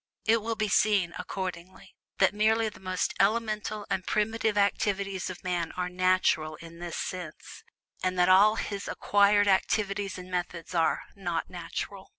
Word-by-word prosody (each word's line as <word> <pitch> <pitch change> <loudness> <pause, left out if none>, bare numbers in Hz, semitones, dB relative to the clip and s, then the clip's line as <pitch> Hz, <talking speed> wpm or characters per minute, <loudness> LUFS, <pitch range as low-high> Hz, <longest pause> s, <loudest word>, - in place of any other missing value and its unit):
It 225 0 +4
will 225 +1 -2
be 215 -1 0
seen, 200 -4 +2
accordingly, 185 0 -6 0.2
that 190 0 +4
merely 220 +1 +2
the 195 - -15
most 185 -1 -2
elemental 215 0 0
and 185 - -1
primitive 215 +1 0
activities 200 -2 0
of 185 - -8
man 175 -2 -1
are 180 0 -2
"natural" 180 -4 +2
in 165 +1 -12
this 175 -1 -5
sense; 175 -4 -6 0.4
and 185 0 -1
that 180 0 +4
all 200 +4 +6
his 200 -2 -4
acquired 205 0 +3
activities 200 0 +1
and 185 0 -10
methods 175 -1 -4
are 165 -2 +1
"not 175 -5 -3
natural." 190 +2 -6
190 Hz, 155 wpm, -28 LUFS, 180-210 Hz, 0.4 s, all